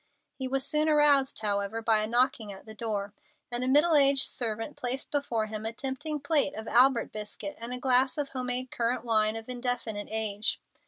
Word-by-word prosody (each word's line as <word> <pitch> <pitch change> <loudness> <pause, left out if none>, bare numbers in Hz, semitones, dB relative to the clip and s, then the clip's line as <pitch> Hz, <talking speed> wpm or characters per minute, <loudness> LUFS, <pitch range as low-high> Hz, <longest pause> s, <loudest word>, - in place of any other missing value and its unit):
He 260 - -4
was 270 +1 0
soon 305 +1 +2
aroused, 290 -5 +3
however, 200 +1 -1
by 225 -1 +3
a 215 - -1
knocking 235 -2 +1
at 195 - -11
the 220 - -10
door, 205 -2 -4 0.4
and 240 +1 0
a - - 0
middle 300 +5 +4
aged 275 -1 +5
servant 225 +3 -3
placed 255 +2 -4
before 245 -7 -1
him 215 0 -6
a 225 - -3
tempting 290 +5 -4
plate 290 -1 +1
of 220 +1 -7
Albert 250 0 +4
biscuit 210 -1 -6
and 230 +1 -6
a 250 - -3
glass 255 +1 +3
of 290 -2 -2
home 255 -2 -4
made 250 +1 -3
currant 235 +1 -1
wine 215 -1 +2
of 225 0 -7
indefinite 245 -4 -3
age. 215 -1 0
245 Hz, 200 wpm, -28 LUFS, 220-270 Hz, 0.4 s, aged